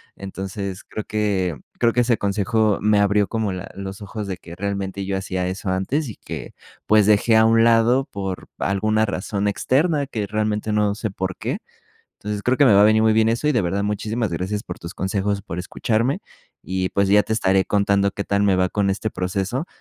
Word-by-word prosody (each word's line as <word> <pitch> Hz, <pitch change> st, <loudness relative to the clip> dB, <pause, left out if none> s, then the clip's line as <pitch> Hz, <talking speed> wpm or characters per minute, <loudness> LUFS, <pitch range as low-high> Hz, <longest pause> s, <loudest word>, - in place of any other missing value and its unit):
Entonces, 95 Hz, 0 st, -6 dB
creo 110 Hz, -, -5 dB
que 100 Hz, -6 st, -1 dB, 0.2 s
creo 120 Hz, -1 st, +4 dB
que 125 Hz, -, +3 dB
ese 120 Hz, -1 st, +2 dB
consejo 100 Hz, +1 st, +1 dB
me 105 Hz, 0 st, +3 dB
abrió 100 Hz, 0 st, +3 dB
como 110 Hz, -3 st, -1 dB
la 90 Hz, +1 st, -6 dB
los 95 Hz, +1 st, -7 dB
ojos 105 Hz, +1 st, -6 dB
de 95 Hz, -2 st, -4 dB
que 85 Hz, -, -11 dB
realmente 100 Hz, 0 st, -3 dB
yo 95 Hz, 0 st, -1 dB
hacía 95 Hz, -1 st, -2 dB
eso 95 Hz, +1 st, -4 dB
antes 125 Hz, +11 st, -1 dB
y 105 Hz, -, -8 dB
que, -, -, -8 dB, 0.3 s
pues, 105 Hz, -1 st, +5 dB
dejé 110 Hz, +2 st, +4 dB
a 110 Hz, -, +6 dB
un 115 Hz, 0 st, +5 dB
lado 115 Hz, +3 st, +4 dB
por 95 Hz, -2 st, -5 dB
alguna 110 Hz, +3 st, +1 dB
razón 100 Hz, 0 st, -2 dB
externa 145 Hz, -, +1 dB
que 110 Hz, -6 st, -3 dB
realmente 105 Hz, +1 st, -1 dB
no 105 Hz, -1 st, +1 dB
sé 110 Hz, 0 st, -3 dB
por 95 Hz, -1 st, -3 dB
qué. -, -, -3 dB, 0.6 s
Entonces, 105 Hz, 0 st, -4 dB
creo 125 Hz, +3 st, +2 dB
que 145 Hz, -, +5 dB
me 110 Hz, -, +6 dB
va 100 Hz, -, +6 dB
a -, -, +7 dB
venir 110 Hz, +1 st, +5 dB
muy 110 Hz, 0 st, +4 dB
bien 110 Hz, 0 st, +3 dB
eso, 120 Hz, +6 st, 0 dB
y -, -, +3 dB
de 120 Hz, -, +2 dB
verdad 95 Hz, +3 st, -1 dB
muchísimas 105 Hz, +1 st, -2 dB
gracias 95 Hz, +5 st, -2 dB
por 90 Hz, -, -8 dB
tus 85 Hz, -, -8 dB
consejos, 100 Hz, +1 st, -1 dB
por 85 Hz, -2 st, -6 dB
escucharme, 115 Hz, -, -1 dB, 0.4 s
y 95 Hz, 0 st, -2 dB
pues, 100 Hz, -1 st, +1 dB
ya 105 Hz, +1 st, +5 dB
te -, -, -3 dB
estaré 95 Hz, -3 st, +2 dB
contando 100 Hz, -1 st, +2 dB
qué 100 Hz, -, -4 dB
tal 100 Hz, 0 st, +1 dB
me 95 Hz, -2 st, +3 dB
va 95 Hz, 0 st, +2 dB
con 100 Hz, -2 st, 0 dB
este 105 Hz, +2 st, -2 dB
proceso 95 Hz, -, -2 dB
100 Hz, 210 wpm, -22 LUFS, 95-110 Hz, 0.6 s, a